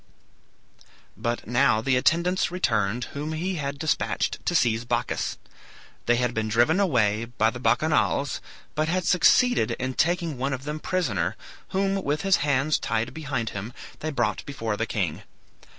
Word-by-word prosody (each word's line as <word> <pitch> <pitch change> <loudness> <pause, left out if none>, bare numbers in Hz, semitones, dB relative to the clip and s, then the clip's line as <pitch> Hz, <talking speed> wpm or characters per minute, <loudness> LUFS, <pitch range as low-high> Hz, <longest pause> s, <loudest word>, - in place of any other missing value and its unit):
But 120 0 -3
now 110 -2 +3
the 130 +3 +1
attendants 170 +8 +2
returned 115 - 0
whom 150 +2 -4
he 180 +3 -2
had 140 -2 -3
despatched 155 +2 -1
to - - +1
seize 115 -1 +2
Bacchus. 120 - -2 0.7
They 120 - +5
had 125 0 0
been 110 -1 -1
driven 120 - +3
away 115 - +2
by 115 -1 +1
the 120 - -8
Bacchanals, 145 0 +1 0.3
but 155 0 0
had 180 +2 0
succeeded 215 - +4
in 130 0 -3
taking 170 -2 0
one 135 +2 -1
of 130 0 -5
them 150 +2 -4
prisoner, 120 - -1 0.3
whom, 195 0 0
with 145 +4 -1
his 195 -1 +4
hands 145 +1 +1
tied 115 +2 -1
behind 140 -7 -3
him, 100 +4 -6 0.3
they 155 - -3
brought 120 -8 -1
before 115 -6 -3
the 115 +2 -2
king. 95 -5 -2
135 Hz, 155 wpm, -25 LUFS, 115-160 Hz, 0.7 s, They